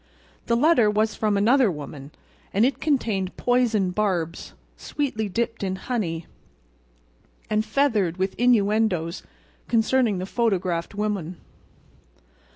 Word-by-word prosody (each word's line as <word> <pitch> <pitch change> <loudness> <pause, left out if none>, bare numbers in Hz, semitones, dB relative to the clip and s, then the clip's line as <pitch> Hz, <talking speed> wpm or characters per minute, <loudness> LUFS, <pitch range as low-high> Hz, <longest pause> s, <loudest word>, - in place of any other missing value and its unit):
The 235 - +2
letter 250 -5 +4
was 215 +1 +1
from 210 -2 0
another 240 +4 +4
woman; 145 -3 -7 0.5
and 210 +4 +4
it 265 0 -1
contained 220 -11 -1
poisoned 230 -7 +1
barbs, 180 -5 -2 0.2
sweetly 220 -8 -3
dipped 230 +4 -2
in 190 -1 -2
honey, 180 -7 -3 1.3
and 215 0 +2
feathered 220 - +1
with 190 +1 -1
innuendoes 210 -7 +2 0.5
concerning 230 -2 +2
the 185 - -3
photographed 190 -6 -1
woman. 200 -5 -3
210 Hz, 110 wpm, -24 LUFS, 185-235 Hz, 1.3 s, letter